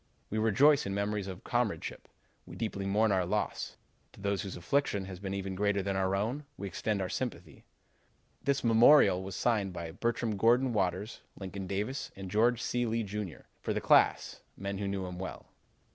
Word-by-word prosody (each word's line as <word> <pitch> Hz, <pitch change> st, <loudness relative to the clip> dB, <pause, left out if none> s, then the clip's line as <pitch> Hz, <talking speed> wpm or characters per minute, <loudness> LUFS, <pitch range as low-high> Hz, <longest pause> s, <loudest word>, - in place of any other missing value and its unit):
We 110 Hz, -, 0 dB
rejoice 130 Hz, +6 st, +4 dB
in 100 Hz, -, -2 dB
memories 100 Hz, 0 st, -1 dB
of 95 Hz, -2 st, -5 dB
his 110 Hz, -, -20 dB
comradeship; 120 Hz, -3 st, -2 dB, 0.4 s
we -, -, -9 dB
deeply 100 Hz, -3 st, -3 dB
mourn 105 Hz, +2 st, +3 dB
our 95 Hz, -2 st, +2 dB
loss. 85 Hz, -, -2 dB, 0.4 s
To -, -, -16 dB
those 100 Hz, -1 st, -1 dB
whose 100 Hz, -3 st, -6 dB
affliction 100 Hz, +1 st, 0 dB
has 95 Hz, -2 st, -8 dB
been 100 Hz, 0 st, -4 dB
even 95 Hz, -1 st, -3 dB
greater 100 Hz, 0 st, +1 dB
than 100 Hz, 0 st, -1 dB
our 95 Hz, 0 st, +1 dB
own, 115 Hz, +9 st, -1 dB
we 100 Hz, -, -5 dB
extend 100 Hz, +2 st, -1 dB
our -, -, -2 dB
sympathy.' 125 Hz, +5 st, -5 dB, 0.8 s
This 140 Hz, -1 st, 0 dB
memorial 115 Hz, -3 st, +6 dB
was 95 Hz, 0 st, -6 dB
signed 105 Hz, -6 st, +1 dB
by 85 Hz, -2 st, -5 dB
Bertram 115 Hz, +3 st, -1 dB
Gordon 120 Hz, +4 st, +4 dB
Waters, 95 Hz, +1 st, -1 dB, 0.2 s
Lincoln 95 Hz, 0 st, -6 dB
Davis, 105 Hz, +9 st, -3 dB
and 95 Hz, -2 st, -7 dB
George 115 Hz, +3 st, +3 dB
C. 120 Hz, -1 st, 0 dB
Lee, 115 Hz, +1 st, 0 dB
Jr., 105 Hz, -3 st, -5 dB, 0.2 s
for -, -, -1 dB
the -, -, +1 dB
class, -, -, +3 dB, 0.2 s
men 100 Hz, 0 st, -4 dB
who 100 Hz, -, -2 dB
knew 100 Hz, -1 st, -2 dB
him 90 Hz, -1 st, -6 dB
well. 95 Hz, -, -6 dB
100 Hz, 190 wpm, -31 LUFS, 95-115 Hz, 0.8 s, memorial